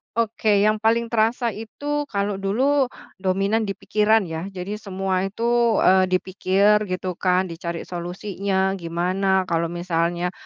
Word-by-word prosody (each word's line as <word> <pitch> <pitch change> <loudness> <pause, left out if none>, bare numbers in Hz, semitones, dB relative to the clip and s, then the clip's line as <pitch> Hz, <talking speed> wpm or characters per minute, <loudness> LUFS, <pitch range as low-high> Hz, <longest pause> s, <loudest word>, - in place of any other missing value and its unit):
Oke, 215 -3 +2
yang 215 0 +2
paling 230 +1 +1
terasa 230 +1 +1
itu, 290 +7 -4
kalau 200 -1 -2
dulu 260 +8 +2 0.3
dominan 195 +4 0
di 195 - -3
pikiran, 215 +1 +2
ya. 165 +2 -5
Jadi 195 +2 -6
semua 190 -2 -2
itu, 235 +2 +1
eee, 185 0 +5
dipikir 195 +3 +2
gitu 185 0 -3
kan, 185 0 +2
dicari 170 0 -5
solusinya 190 +2 -2
gimana. 185 +3 0
Kalau 165 0 +1
misalnya, 175 0 -1
195 Hz, 130 wpm, -23 LUFS, 185-220 Hz, 0.3 s, eee